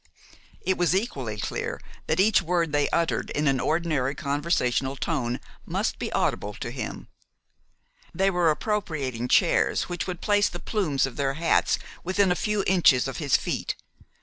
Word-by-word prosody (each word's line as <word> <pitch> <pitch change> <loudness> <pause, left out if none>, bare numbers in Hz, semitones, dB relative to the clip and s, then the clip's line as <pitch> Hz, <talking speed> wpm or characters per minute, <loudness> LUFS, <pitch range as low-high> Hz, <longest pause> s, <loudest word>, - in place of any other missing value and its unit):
It 190 -1 0
was 175 +1 +3
equally 135 - -2
clear - - -3 0.3
that 160 - +1
each 210 +2 +5
word 170 -2 0
they 145 -1 +2
uttered 170 -1 0
in 150 0 0
an 135 -2 +2
ordinary 155 -5 0
conversational 140 -2 0
tone 130 -5 -2 0.2
must 195 +6 -2
be - - -3
audible - - -1
to - - -5
him. - - -6 1.0
They 195 +1 +2
were 175 -3 +3
appropriating 150 - -2
chairs - - +3
which 175 0 -3
would 180 -2 -4
place 205 -1 +3
the 175 - -7
plumes 165 -9 0
of 135 - -7
their 135 -1 0
hats 165 +2 +2 0.3
within 190 +1 +2
a - - +3
few 210 +1 0
inches 165 -9 +4
of 135 - -5
his 145 -4 +3
feet. - - -3
165 Hz, 160 wpm, -26 LUFS, 135-185 Hz, 1.0 s, each